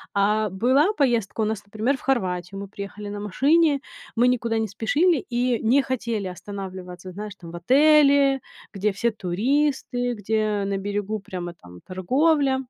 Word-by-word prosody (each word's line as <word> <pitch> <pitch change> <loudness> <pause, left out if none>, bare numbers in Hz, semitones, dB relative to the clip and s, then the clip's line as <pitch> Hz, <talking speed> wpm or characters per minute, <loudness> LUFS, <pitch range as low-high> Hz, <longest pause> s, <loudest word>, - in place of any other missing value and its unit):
А 210 +1 +2
была 260 - +2
поездка 235 -6 +1
у - - +2
нас, 215 -1 -3
например, 220 +7 -1
в - - -17
Хорватию. 190 -7 -1
Мы 200 - -6
приехали 205 +1 -7
на 205 0 -5
машине. 280 - +2 0.3
Мы 240 +2 +4
никуда 230 -2 0
не 220 - -1
спешили 285 - +2
и 245 -1 +1
не 265 +5 +4
хотели 235 -5 -2
останавливаться, 185 -1 -8
знаешь, 205 +2 -7
там, 170 -2 -10
в - - -9
отеле, 280 - +5 0.3
где 200 +1 0
все 235 +4 0
туристы, 245 +5 0
где 210 0 -1
на 200 -1 -1
берегу 205 +2 -3
прямо 175 -3 -6
там 90 - -15
торговля. 270 - +2
215 Hz, 155 wpm, -24 LUFS, 195-265 Hz, 0.3 s, отеле